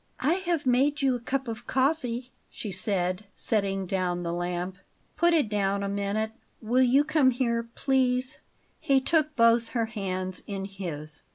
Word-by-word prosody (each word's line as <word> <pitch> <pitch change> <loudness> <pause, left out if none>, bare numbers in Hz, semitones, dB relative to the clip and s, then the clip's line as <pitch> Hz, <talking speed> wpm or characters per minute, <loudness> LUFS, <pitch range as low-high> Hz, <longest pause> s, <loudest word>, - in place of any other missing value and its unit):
"I 295 +6 +3 0.2
have 330 -5 0
made 275 +4 +2
you 265 -1 +4
a 245 - -2
cup 265 +2 -2
of 230 +1 -6
coffee," 260 -3 0 0.2
she 210 - -6
said, 185 0 0
setting 195 -3 +1
down 180 -1 -1
the 170 0 -2
lamp. 175 +1 -3 0.4
"Put 345 0 +3
it 300 -8 +2
down 200 -1 0
a - - -1
minute. 200 +2 -1 0.3
Will 240 +3 +2
you 260 +3 +5
come 295 -3 +3
here, 235 -2 -1
please." 255 -1 +1 0.4
He 275 -1 +3
took 305 +2 +1
both 230 0 +4
her 230 - +2
hands 185 -4 -3
in 195 -2 -4
his. 160 -6 -5
230 Hz, 165 wpm, -27 LUFS, 195-260 Hz, 0.4 s, you